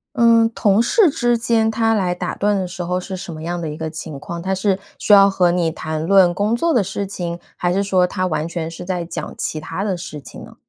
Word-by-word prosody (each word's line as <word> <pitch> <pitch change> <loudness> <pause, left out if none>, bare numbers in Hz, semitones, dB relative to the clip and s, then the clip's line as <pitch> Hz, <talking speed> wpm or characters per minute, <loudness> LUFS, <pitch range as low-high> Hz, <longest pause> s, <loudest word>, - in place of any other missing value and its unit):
嗯， 230 -2 +5
同 205 +1 +3
事 365 - +4
之 240 -5 +1
间 225 -1 +1
他 225 0 +1
来 185 -4 0
打 - - -4
断 205 0 +1
的 185 -1 -2
时 180 0 -6
候 180 +1 -1
是 190 +1 -6
什 185 -1 -7
么 155 0 -8
样 175 +1 -3
的 160 - -3
一 150 - -6
个 160 0 -4
情 155 -2 -7
况？ 170 +4 -6
他 190 +2 -1
是 190 0 0 0.2
需 210 - +3
要 200 0 +8
和 180 -3 +2
你 175 -2 +1
谈 155 -1 -4
论 185 -1 +5
工 210 +5 0
作 330 +7 +1
的 235 - +3
事 200 +2 -4
情， 175 -3 -5 0.2
还 175 - -1
是 195 +2 +1
说 185 -2 +2
他 185 +1 -2
完 160 -3 -1
全 170 -1 -4
是 165 +1 -8
在 180 -1 -3
讲 170 - -6
其 155 - -3
它 170 +5 -5
的 200 -3 -1
事 160 -3 -7
情 135 - -11
呢？ - - -13
185 Hz, 275 characters per minute, -20 LUFS, 170-205 Hz, 0.2 s, 要